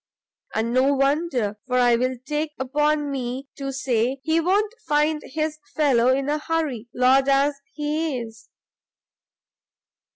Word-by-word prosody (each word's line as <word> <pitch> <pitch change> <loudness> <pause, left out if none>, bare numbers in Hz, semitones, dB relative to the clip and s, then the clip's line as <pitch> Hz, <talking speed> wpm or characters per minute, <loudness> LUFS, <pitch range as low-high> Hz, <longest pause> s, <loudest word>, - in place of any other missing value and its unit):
And 225 +2 0
no 265 +3 +3
wonder, 275 -7 0
for 250 -1 +1
I 245 -1 +5
will 255 +2 0
take 300 0 -2
upon 295 +2 0
me 260 +1 -4
to 275 -1 -4
say 260 -1 0
he 320 +2 +2
won't 405 +5 +1
find 300 +1 +2
his 310 +1 -3 0.2
fellow 265 -6 +3
in 270 +1 0
a 300 +1 0
hurry, 300 -8 -2
Lord 260 +3 +3
as 280 +1 +2
he 300 -1 -1
is." 225 -1 -10
275 Hz, 135 wpm, -23 LUFS, 255-300 Hz, 0.2 s, I